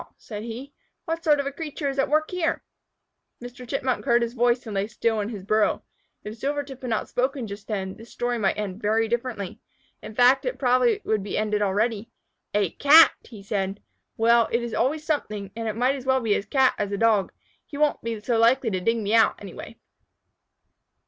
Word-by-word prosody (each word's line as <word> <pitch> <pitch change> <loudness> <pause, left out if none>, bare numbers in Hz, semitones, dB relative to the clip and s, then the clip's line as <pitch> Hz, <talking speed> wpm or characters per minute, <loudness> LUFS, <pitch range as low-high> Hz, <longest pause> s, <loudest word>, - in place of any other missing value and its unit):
said 210 -2 -8
he. 240 +5 -7 0.3
"What 330 -1 -3
sort 300 -2 +4
of 280 0 -3
creature 300 -2 -4
is 275 0 -2
at 270 - +1
work 310 +1 +1
here?" 360 -3 -1 0.8
Mr. 245 +1 -10
Chipmunk 265 -2 -1
heard 235 0 +3
his 235 0 -3
voice, 245 0 +1
and 220 - -6
lay 195 +1 -1
still 225 0 -1
in 205 0 -2
his 205 -5 -7
burrow. 215 +2 +1 0.4
If 215 +2 -8
Silvertip 280 -1 -3
had 255 - -5
not 220 - -1
spoken 260 0 -1
just 200 -1 -9
then, 190 -3 -3
this 225 +1 -14
story 240 -1 -2
might 195 -3 +1
end 210 0 -4
very 220 +2 +1
differently. 230 -4 -3 0.4
In 215 - -9
fact, 250 +3 +5
it - - -1
would - - -23
probably 250 -2 +3 0.2
be 200 - -4
ended 210 -1 0
already. 210 +2 0 0.5
"A 200 -5 +2
Cat!" 310 +3 +7 0.3
said 195 -1 -2
he. - - -34 0.3
"Well, 230 0 +4
it 235 +1 0
is 235 - -5
always 305 +4 0
something, 210 - -3
and 225 0 -4
it 215 - -2
might 250 +4 +2
as 265 -2 -7
well 265 0 +3
be 225 -4 +1
a - - 0
Cat 260 +5 +2
as 205 -1 -2
a 200 - -1
Dog. 215 -3 +2 0.4
He 285 - -8
won't 300 0 +1
be 230 -1 -4
so 230 +1 0
likely 235 +1 +3
to 185 - -1
dig 230 +5 +1
me 210 -1 -2
out, 225 -1 +5
anyway." - - -10
235 Hz, 205 wpm, -25 LUFS, 210-265 Hz, 0.8 s, Cat